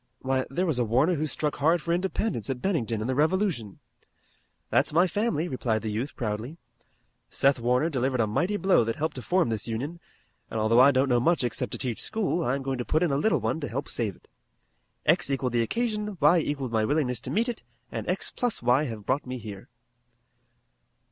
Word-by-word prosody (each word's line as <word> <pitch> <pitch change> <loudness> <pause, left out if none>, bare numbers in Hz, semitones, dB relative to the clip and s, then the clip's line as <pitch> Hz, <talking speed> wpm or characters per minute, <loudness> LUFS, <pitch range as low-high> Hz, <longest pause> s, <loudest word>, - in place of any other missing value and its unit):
"Why, 130 0 0
there 180 +7 0
was 155 -8 0
a - - +3
Warner 130 +10 +2
who 155 -1 -1
struck 150 0 -2
hard 160 +4 +3
for 170 +2 -1
independence 185 - -1
at 130 -2 -2
Bennington 125 - -1
in 110 - -2
the 130 - 0
Revolution." 155 - 0 0.9
"That's - - +3
my 170 +4 +4
family," 185 -4 0
replied 120 -7 -1
the 110 - -2
youth 120 +7 -3
proudly. 115 +6 -4 0.7
"Seth 140 -1 +2
Warner 125 +6 +2
delivered 130 -4 -1
a 115 - +4
mighty 175 - 0
blow 190 -10 +4
that 115 0 -2
helped 160 +2 -2
to - - -4
form 180 -1 +1
this 110 -1 -1
Union, 135 +10 -4 0.5
and 110 - -3
although 110 +2 +4
I 130 +2 +8
don't 135 0 +2
know 120 -2 +3
much 165 +4 +2
except 120 -2 -2
to - - -3
teach 120 -4 -3
school 200 -5 -1
I'm 135 +1 -1
going 135 -1 -2
to - - -1
put 155 +7 +1
in 170 - +1
a - - +1
little 150 - +2
one 115 +8 -1
to 145 - -4
help 140 +4 -4
save 110 -6 -2
it. - - -25 0.8
X - - +3
equalled 130 -3 -1
the 120 - +3
occasion, 210 - -2
y 150 +4 +5
equalled 140 -5 -2
my 110 -1 +2
willingness 125 -2 0
to - - -7
meet 230 +4 +1
it, 240 -2 -4 0.3
and - - -4
x - - -1
plus 245 - -1
y 125 +5 +3
have 110 -6 -6
brought 130 +1 0
me 130 0 -4
here." 105 -4 -9
135 Hz, 215 wpm, -27 LUFS, 120-170 Hz, 0.9 s, I